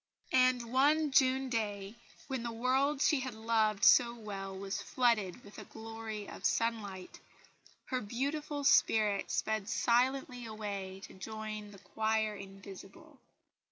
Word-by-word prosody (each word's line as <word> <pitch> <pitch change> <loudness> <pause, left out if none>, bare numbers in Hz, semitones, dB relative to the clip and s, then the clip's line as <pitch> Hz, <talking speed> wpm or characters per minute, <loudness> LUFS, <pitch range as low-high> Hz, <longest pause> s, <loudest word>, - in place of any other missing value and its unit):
And 255 -2 +3
one 295 +3 +3
June 265 0 +3
day, 205 -4 -3 0.3
when 265 -3 -3
the 235 0 -4
world 265 +5 +1
she 300 - +3
had 260 -3 -5
loved 220 -2 +1
so 235 -1 +6
well 195 -4 -6
was 195 0 -4
flooded 235 -5 +1
with 205 - -12
a - - -7
glory 220 -2 -7
of - - -10
sunlight, 205 -5 -1 0.7
her 255 -1 -2
beautiful 285 +6 -3
spirit 215 -6 +3
sped 215 -2 -1
silently 245 +2 +1
away 200 -3 -5
to - - -10
join 215 +1 -6
the 205 - -13
"choir 220 +3 -1
invisible." 195 - -12
225 Hz, 130 wpm, -33 LUFS, 205-255 Hz, 0.7 s, so